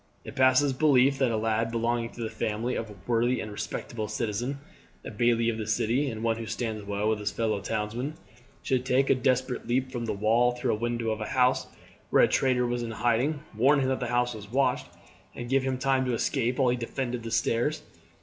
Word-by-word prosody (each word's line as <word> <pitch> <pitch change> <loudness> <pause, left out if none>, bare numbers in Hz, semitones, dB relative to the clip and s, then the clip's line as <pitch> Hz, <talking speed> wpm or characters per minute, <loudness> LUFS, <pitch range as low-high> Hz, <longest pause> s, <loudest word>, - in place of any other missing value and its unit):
"It - - -9
passes 130 +1 +4
belief 135 -1 +4
that 130 -3 +3
a 115 - 0
lad, 110 +1 0
belonging 115 0 -1
to 120 - -8
the 110 - -2
family 110 +4 -2
of 115 - -3
a 105 - -11
worthy 120 +1 +1
and 110 - -5
respectable 110 +1 -4
citizen, 115 +5 -2 0.5
a - - -5
bailie 115 +1 +2
of 115 -1 -1
the 110 - -4
city 115 +6 +1
and 110 -2 -6
one 115 -1 +1
who 115 -1 -6
stands 110 -3 -3
well 100 +1 -2
with 110 -1 +1
his 105 0 -1
fellow 110 -3 -1
townsmen, 115 - -3 0.5
should 130 -1 0
take 130 +1 +2
a - - +8
desperate 130 -1 0
leap 130 +2 0
from 120 -2 -3
the 110 - -1
wall 115 +4 +2
through 125 0 -1
a - - +1
window 120 0 -1
of 110 0 -3
a 110 - -3
house 125 -1 +2 0.4
where - - +5
a - - +6
traitor 125 -2 +2
was 120 0 -1
in 120 - -4
hiding, 120 +6 0
warn 135 +6 +4
him 130 -1 +1
that 130 - 0
the 125 - -2
house 120 0 +1
was 105 -1 -10
watched, 135 +2 +1 0.5
and 120 0 -6
give 135 0 +4
him 130 -1 -1
time 135 0 +1
to 125 -2 0
escape 125 +1 0
while 130 -2 +3
he 125 - +1
defended 120 0 -3
the 115 - -6
stairs. 120 +6 0
120 Hz, 225 wpm, -27 LUFS, 110-130 Hz, 0.5 s, a